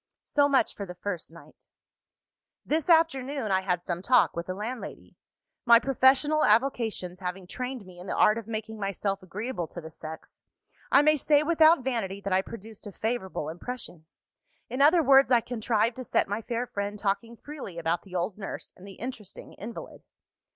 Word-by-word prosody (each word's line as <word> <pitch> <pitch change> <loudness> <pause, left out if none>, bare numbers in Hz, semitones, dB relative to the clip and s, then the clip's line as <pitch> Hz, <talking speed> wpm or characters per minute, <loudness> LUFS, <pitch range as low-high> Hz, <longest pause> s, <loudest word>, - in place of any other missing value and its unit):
"So 285 -1 +2
much 270 -5 +2
for 200 - -6
the 180 - -8
first 180 -3 -5
night. 170 - -17 1.0
"This 315 +2 -1
afternoon, 280 - +2
I 190 0 +3
had 180 -2 -1
some 175 -1 -3
talk 245 +5 +4
with 170 0 -4
the 185 - -3
landlady. 230 +5 -7 0.5
My 235 -2 +8
professional 270 +4 +3
avocations 220 -6 +1
having 185 0 -5
trained 250 +2 -5
me 180 -1 -13
in 180 - -10
the - - -2
art 215 +2 +4
of 225 - -11
making 220 -1 -5
myself 195 0 -2
agreeable 195 0 -4
to 175 - -8
the 160 -1 -9
sex, 160 +1 -10 0.5
I 280 - +6
may 305 0 +4
say 295 +1 +3
without 320 -2 +5
vanity 225 -7 -2
that 195 -1 -2
I 190 - +4
produced 220 0 -10
a - - -7
favourable 195 -7 -3
impression. 175 -1 -7 0.6
In 255 - -1
other 320 +4 +6
words, 275 -1 +6
I 245 -2 +6
contrived 230 0 0
to 255 - -5
set - - +1
my 205 +2 -2
fair 235 +2 -2
friend 205 -2 -4
talking 220 +4 -2
freely 275 - -9
about 170 +1 0
the 185 -2 -12
old 180 +4 -2
nurse 195 - -6
and 185 - -13
the 195 - -9
interesting 225 -4 -8
invalid. 225 +3 -9
220 Hz, 180 wpm, -27 LUFS, 190-260 Hz, 1.0 s, My